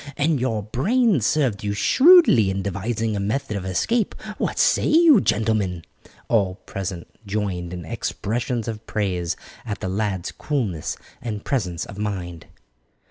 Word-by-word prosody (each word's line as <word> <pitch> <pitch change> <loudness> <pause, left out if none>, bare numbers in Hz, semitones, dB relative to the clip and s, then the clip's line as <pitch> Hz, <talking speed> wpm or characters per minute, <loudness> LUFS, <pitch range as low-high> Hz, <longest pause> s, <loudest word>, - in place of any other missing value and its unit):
And 150 -1 +2
your 115 -5 -1
brains 180 - +2
served 130 -10 +1
you 100 0 -1
shrewdly 265 - +6
in 95 0 -2
devising 105 +3 -2
a - - -2
method 105 +2 -2
of 95 -2 -4
escape. 215 - 0 0.2
What - - -1
say - - +3
you, 315 - +6
gentlemen?" 105 -6 0 0.4
All 100 -5 +2
present 95 -3 -6 0.2
joined 95 -4 -2
in 90 -2 -6
expressions 115 +7 -3
of 110 -1 -6
praise 90 -5 -1 0.3
at 105 -4 -5
the 95 - -3
lad's 95 -2 -2
coolness 110 - -3 0.2
and 110 -4 -5
presence 90 - -1
of 100 - -10
mind. 90 -5 -4
105 Hz, 140 wpm, -23 LUFS, 95-125 Hz, 0.4 s, shrewdly